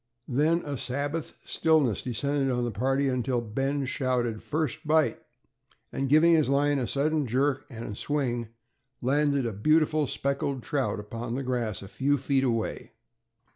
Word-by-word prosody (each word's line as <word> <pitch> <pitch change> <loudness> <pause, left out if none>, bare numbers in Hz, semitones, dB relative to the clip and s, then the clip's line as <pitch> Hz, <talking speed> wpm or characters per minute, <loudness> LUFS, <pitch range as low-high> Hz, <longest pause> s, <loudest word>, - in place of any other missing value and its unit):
Then 155 +6 +2
a 145 -2 -3
Sabbath 145 +6 -3
stillness 155 - +2
descended 135 +3 -1
on 125 -1 0
the 120 - -1
party, 135 +6 +1
until 125 -1 0
Ben 135 +5 -1
shouted, 125 -4 -1
"first 155 0 -2
bite," 155 0 +2 0.7
and 135 -1 -2
giving 155 +4 +6
his 155 -4 +3
line 145 +1 +2
a 125 - -1
sudden 150 0 0
jerk 135 +3 0
and 115 -4 -6
swing, 120 -4 -1 0.5
landed 140 +1 +1
a 115 - -2
beautiful 155 +6 +2
speckled 140 -1 -2
trout 135 -6 -1
upon 115 +3 -5
the 135 - -2
grass 120 -6 -2
a - - -8
few 140 +7 +1
feet 135 0 +1
away. 115 -4 -2
135 Hz, 150 wpm, -27 LUFS, 120-145 Hz, 0.7 s, giving